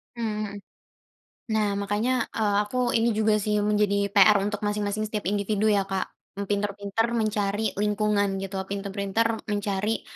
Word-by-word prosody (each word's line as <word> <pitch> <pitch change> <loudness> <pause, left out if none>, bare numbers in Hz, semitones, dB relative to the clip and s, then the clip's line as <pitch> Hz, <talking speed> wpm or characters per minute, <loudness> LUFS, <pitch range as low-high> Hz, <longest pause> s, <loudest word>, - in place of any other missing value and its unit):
Mhm 230 -2 -2
mhm. 200 - -8 1.0
Nah 215 -1 +2
makanya, 215 +5 0
eee, 210 -2 +1
aku, 230 - -6 0.2
ini 230 +1 +2
juga 215 0 +3
sih 210 0 -1
menjadi 205 -1 +1
PR 205 +1 +7
untuk 205 +1 -2
masing-masing 210 +1 -1
setiap 210 -3 -2
individu 210 +1 +1
ya 200 -2 +2
Kak, 195 -1 -2 0.3
m 200 - -3
pinter-pinter 205 +2 0
mencari 215 -1 0
lingkungan 210 -1 +1
gitu, 195 0 -4
pinter-pinter 200 +3 -1
mencari, 205 +1 -1
205 Hz, 140 wpm, -26 LUFS, 200-215 Hz, 1.0 s, PR